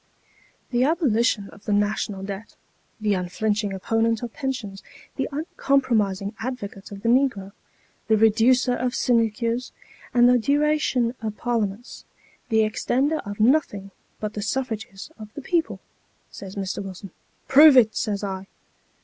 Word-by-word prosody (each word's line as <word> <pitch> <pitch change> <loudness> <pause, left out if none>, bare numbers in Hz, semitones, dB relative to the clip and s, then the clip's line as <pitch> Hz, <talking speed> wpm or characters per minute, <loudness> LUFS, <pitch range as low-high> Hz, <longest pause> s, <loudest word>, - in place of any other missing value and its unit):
' - - -34
The 245 0 +2
abolitionist 240 - +1
of 205 - -17
the 210 - -2
national 205 -1 -1
debt, 200 +2 -7 0.4
the 210 -1 +1
unflinching 205 +3 -1
opponent 225 +4 0
of 235 - -5
pensions, 245 -8 -4 0.3
the - - -2
uncom 280 -2 0
promising 200 -4 0
advocate 215 -5 -6
of 200 0 -9
the - - -1
negro, 235 -6 +2 0.6
the 220 -1 +4
reducer 230 +4 +4
of 250 0 -2
sinecures 230 +1 0 0.4
and 240 0 +5
the 250 0 +5
duration 285 -2 +1
of 215 -1 -4
Parliaments; 230 -1 -3 0.4
the 220 -2 +3
extender 265 +7 0
of 205 - -7
nothing 215 -5 +2 0.3
but 215 0 -4
the 210 - -4
suffrages 220 -1 -4
of 215 -1 -10
the 290 - -6
people,' 340 -1 -1 0.5
says 195 -1 -9
Mr. 195 0 -3
Wilson. 190 0 -9 0.2
' - - -41
Prove 290 0 +8
it,' 220 -3 +5
says 205 -1 -2
I. 190 -1 -4
220 Hz, 145 wpm, -24 LUFS, 205-255 Hz, 0.6 s, Prove